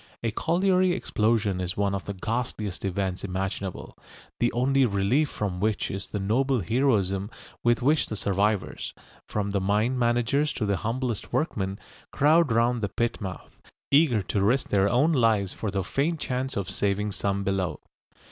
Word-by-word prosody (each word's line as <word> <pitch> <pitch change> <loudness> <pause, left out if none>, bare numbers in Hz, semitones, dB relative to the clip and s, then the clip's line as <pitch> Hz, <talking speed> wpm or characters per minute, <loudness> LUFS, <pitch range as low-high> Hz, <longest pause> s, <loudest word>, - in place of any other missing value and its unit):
A 115 - 0
colliery 180 - +2
explosion 105 - 0
is 90 0 -3
one 100 -1 +1
of 100 - -3
the 100 - -5
ghastliest 110 -1 -3
events 95 -1 -2
imaginable, 95 0 -4 0.4
the 120 - +2
only 135 +3 +2
relief 120 +7 +2
from 95 -4 -3
which 110 +1 0
is 95 0 -5
the - - -4
noble 120 +6 +1
heroism 100 -3 +1 0.3
with 120 0 +2
which 150 +3 +3
the 110 - -4
survivors, 100 0 -1 0.3
from 100 -1 -2
the 100 -1 0
mine 105 +6 +1
managers 120 +5 +1
to 110 - -2
the 100 -1 +1
humblest 115 +2 -3
workmen, 100 - -1 0.3
crowd 155 0 +4
round 115 +1 +2
the 100 - -1
pit 120 +4 -2
mouth, 95 -3 -8 0.3
eager 140 -8 +4
to 100 +2 -1
risk 120 +7 +2
their 100 0 +3
own 135 +10 +3
lives 110 - +2
for 110 - -4
the 95 -1 -1
faint 155 - -1
chance 130 -2 -2
of 100 -2 -2
saving 100 +2 0
some 100 0 -1
below. 95 -5 -1
105 Hz, 165 wpm, -26 LUFS, 100-125 Hz, 0.4 s, crowd